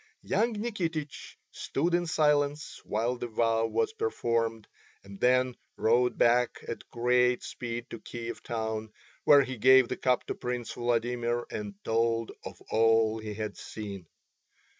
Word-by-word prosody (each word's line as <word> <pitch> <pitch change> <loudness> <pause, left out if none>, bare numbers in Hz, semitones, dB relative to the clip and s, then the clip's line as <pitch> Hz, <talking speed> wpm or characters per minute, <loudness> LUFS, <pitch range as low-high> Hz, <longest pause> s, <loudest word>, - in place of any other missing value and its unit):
Young 220 +5 +1
Nikitich 175 -9 -4 0.2
stood 170 +6 -2
in 175 0 +2
silence 150 -1 +1
while 115 +4 -1
the 120 - -3
vow 115 0 +1
was 435 - 0
performed, 115 - -1 0.4
and 100 0 -12
then 125 0 +3 0.2
rode 120 +1 +2
back 120 +1 +3
at 115 - -6
great 125 +1 +2
speed 120 -1 -5
to 115 - -6
Kiev 120 +1 -7
town, 110 -1 -3 0.3
where 145 -1 +7
he 130 -1 -6
gave 130 +1 +6
the - - -3
cup 125 -1 +1
to - - -3
Prince 125 -1 -4
Vladimir 120 0 -1
and 105 -1 -5
told 115 0 +1
of - - -9
all 115 0 +3
he 105 -1 -6
had 110 0 -4
seen. 100 -5 -7
120 Hz, 140 wpm, -29 LUFS, 115-130 Hz, 0.4 s, where